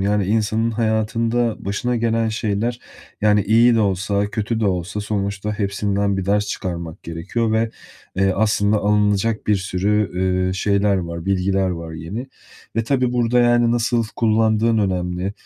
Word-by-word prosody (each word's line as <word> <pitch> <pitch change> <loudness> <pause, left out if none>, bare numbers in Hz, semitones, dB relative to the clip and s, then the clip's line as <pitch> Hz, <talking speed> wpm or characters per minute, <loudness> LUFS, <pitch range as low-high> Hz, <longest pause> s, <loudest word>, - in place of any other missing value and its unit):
Yani 100 0 +1
insanın 110 +2 +1
hayatında 115 +1 0
başına 120 +5 -1
gelen 115 -1 +1
şeyler, 110 +2 -2 0.4
yani 105 -1 +3
iyi 115 +3 +4
de 115 - +3
olsa 100 +1 0
kötü 110 +1 -2
de 105 - +1
olsa, 95 +2 -2
sonuçta 105 0 -3
hepsinden 100 0 0
bir 95 - -2
ders 105 +1 +1
çıkarmak 85 -4 -5
gerekiyor. 95 +8 -2
Ve, 110 0 +1 0.5
eee, 95 0 +2
aslında 105 0 +2
alınacak 105 +1 +1
bir 105 -1 +3
sürü, 95 +2 0 0.4
eee, 95 - -1
şeyler 100 +1 +1
var, 85 -1 -4
bilgiler 95 0 +1
var 85 -2 -6
yeni. 90 +11 -6 0.5
E, 115 -1 0
tabii 125 -1 +1
burada, 120 0 +2
yani, 120 -1 +3
nasıl 120 0 +1
kullandığın 110 0 +2
önemli, 90 -1 -1
105 Hz, 145 wpm, -20 LUFS, 95-115 Hz, 0.5 s, iyi